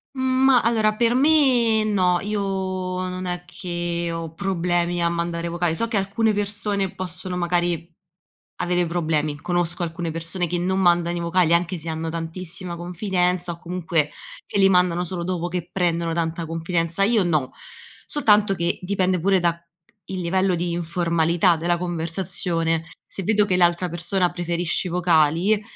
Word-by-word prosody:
Mhmm, 260 - -4 0.2
ma 260 -3 +6
allora 220 -2 +2
per 235 +1 +2
me 255 -6 +4
no, 185 -4 +2
io 205 0 -2
non 185 -1 -3
è 180 0 -3
che 175 -1 -3
ho 165 -1 -5
problemi 175 -2 0
a 170 - +3
mandare 170 0 -2
vocali, 170 -1 0
so 230 - 0
che 225 -3 0
alcune 210 +3 +1
persone 205 -1 -2
possono 180 0 -4
magari 175 -1 -1 0.7
avere 175 -1 +1
problemi. 155 -3 0
Conosco 175 0 -1
alcune 165 0 -3
persone 165 +2 -2
che 175 +2 -2
non 190 +2 0
mandano 175 -1 +2
i - - -2
vocali 170 0 +2
anche 175 +1 +1
se 165 +1 -6
hanno 160 0 -3
tantissima 170 +2 -5
confidenza 180 0 -1
o 170 - -14
comunque 170 -3 -1 0.4
che - - -2
li 195 0 +6
mandano 180 -1 +3
solo 175 0 -4
dopo 175 -1 -2
che 175 -1 -4
prendono 170 -2 0
tanta 165 0 -2
confidenza, 165 +2 0
io 215 -1 +4
no. 155 -7 0 0.6
Soltanto 210 -8 +3
che 170 0 -1
dipende 185 -1 0
pure 190 +2 +3
da 170 -1 +2
c 170 0 -27 0.5
il 185 -1 -3
livello 185 +1 +1
di 170 0 -2
informalità 170 0 +1
della 175 +2 +1
conversazione, 170 -1 -2 0.2
se 195 - -6
vedo 210 +1 +3
che 185 -2 +1
l’altra 175 0 +3
persona 175 +2 0
preferisce 175 0 -1
i - - -5
vocali 175 +4 +3
175 Hz, 160 wpm, -23 LUFS, 170-190 Hz, 0.7 s, ma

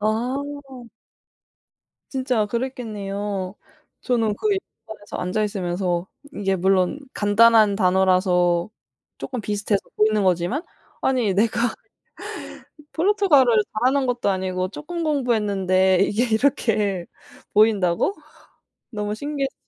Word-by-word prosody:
아. 225 +5 0 1.7
진짜 255 -5 0
그랬겠네요. 205 -5 -4 0.5
저는 225 -4 +1
그 430 - -1 0.4
영화관에서 205 -2 -8
앉아 180 +4 -1
있으면서 180 -3 -2 0.3
이게 195 -2 0
물론 190 +7 +1
간단한 210 0 +5
단어라서 180 -2 +2 0.5
쪼끔 255 -2 -5
비슷해서 205 -1 -1 0.2
보이는 215 0 +3
거지만 185 - +1 0.4
'아니 250 -6 +1
내가 230 +3 +1 1.2
포르투갈어를 315 - +4 0.2
잘하는 265 +3 +2
것도 245 -4 0
아니고 185 -1 -1
쪼끔 335 - -6
공부했는데 200 - +2
이게 210 +4 +2
이렇게 215 -8 +1 0.5
보인다고?' 210 - +3 0.8
너무 210 -2 -3
신기했어요. 280 +2 -3
210 Hz, 260 characters per minute, -22 LUFS, 190-245 Hz, 1.7 s, 간단한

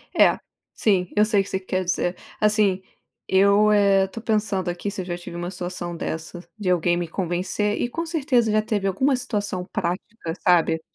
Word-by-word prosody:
É, - - +5 0.4
sim, 185 -4 +1
eu 210 0 +5
sei 210 -2 +3
o - - -2
que 195 - -10
você 190 - -1
quer 185 0 -2
dizer. 180 0 -1 0.2
Assim 210 -3 +2 0.5
eu, 200 +2 +5
eh, 200 -2 +4
estou 215 +4 -9
pensando 210 -5 0
aqui 175 +3 -3
se 200 -1 -4
eu - - -7
já 175 -1 -4
tive 175 -1 -9
uma 175 +1 -4
situação 175 -2 -5
dessas, 165 +2 -5
de 205 -4 -2
alguém 175 -1 +2
me 175 0 -2
convencer. 185 +4 -1
E 240 - 0
com 330 +7 -3
certeza 270 -8 +1
já 215 0 +3
teve 210 -2 -1
alguma 260 +9 +2
situação 205 -7 -3
prática, 180 0 -3
sabe. 165 -2 +3
195 Hz, 190 wpm, -23 LUFS, 180-215 Hz, 0.5 s, É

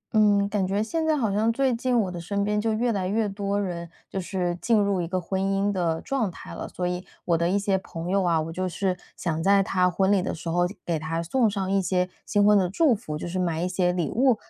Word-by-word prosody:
嗯， 205 -2 +4
感 200 -2 0
觉 200 +3 0
现 320 +8 -1
在 310 -1 +3
好 225 -7 0
像， 215 +3 +2
最 265 +2 +1
近 240 +1 +1
我 190 -3 -2
的 175 -1 -6
身 200 +4 -1
边 210 +1 0
就 225 +1 0
越 235 +2 +1
来 195 -4 -1
越 215 +3 +1
多 200 0 -2
人， 170 -3 -4 0.2
就 190 - -2
是 175 -2 -2
进 230 -2 +3
入 200 -2 +1
一 170 - -3
个 185 +2 -1
婚 190 +2 -2
姻 195 +1 +1
的 170 -4 0
状 260 -7 -1
态 175 - -10
了。 - - -5
所 180 - -4
以， 180 0 -3 0.2
我 170 - +2
的 170 +1 +1
一 195 - +2
些 200 -1 +1
朋 170 -2 -7
友 195 0 +3
啊， 170 -2 +2
我 160 +1 -3
就 185 +2 -2
是 185 +1 -1 0.2
想 165 -2 -2
在 195 +3 +4
她 180 -1 +2
婚 190 +2 +1
礼 200 -2 +4
的 180 - -3
时 165 +1 -6
候 175 +1 +2 0.2
给 165 -2 -1
她 165 +2 -2
送 230 +6 +2
上 195 -2 -2
一 195 0 +3
些 180 0 0 0.2
新 205 0 +3
婚 210 0 +6
的 190 -3 +3
祝 275 - +3
福， 155 -9 -4
就 155 - -5
是 185 +2 -3
买 170 -2 0
一 - - +1
些 180 -1 +1
礼 175 -3 -1
物， 255 +1 +4
195 Hz, 285 characters per minute, -25 LUFS, 175-205 Hz, 0.2 s, 婚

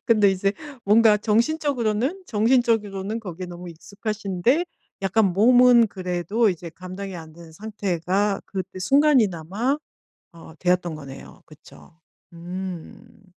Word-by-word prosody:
근데 210 -4 +4
이제 195 +1 0 0.3
뭔가 215 +1 +5
정신적으로는 245 - 0
정신적으로는 220 -3 +1
거기에 185 -3 -7
너무 175 0 -9
익숙하신데 205 - -2 0.4
약간 195 0 +2
몸은 240 +3 +6
그래도 185 +4 -1
이제 170 -1 -7
감당이 185 +1 -7
안 160 -2 -10
된 165 0 -14
상태가 200 0 -2
그때 185 -1 -6
순간이나마 235 - +2 0.5
어 165 -1 -13
되었던 180 -2 0
거네요. 140 -3 -11
그쵸. 155 -1 -17 0.4
음. 180 +2 -8
200 Hz, 280 characters per minute, -23 LUFS, 180-225 Hz, 0.5 s, 몸은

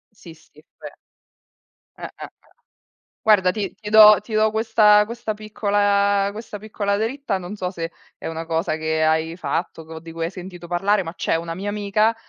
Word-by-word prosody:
Sì, 170 -5 -13
sì, 155 -1 -22 0.2
ve - - -10 1.0
Eh, - - -12
Eh, - - -6
Eh. - - -5 1.0
Guarda, 195 -4 +4
ti 205 -3 -3
ti 210 -1 -8
do 215 -1 +9
ti 215 +2 -11
do 215 0 +3
questa 215 -1 +4
questa 235 0 -5
piccola 205 -1 +1
questa 215 0 -8
piccola 205 -1 -2
dritta, 225 0 -2
non 185 +2 -7
so 185 -3 -3
se 165 -2 -5 0.3
è - - -11
una 165 0 -5
cosa 160 -1 -1
che 160 0 -1
hai 160 +1 +1
fatto, 175 -2 -3
o 160 0 -9
di 165 +1 -11
cui 165 0 -5
hai 165 - -4
sentito 180 -2 -10
parlare, 195 +3 +1
ma 165 - -7
c'è 165 - -1
una 165 0 -3
mia 195 +4 -4
amica, 210 +2 +1
200 Hz, 185 wpm, -22 LUFS, 165-215 Hz, 1.0 s, do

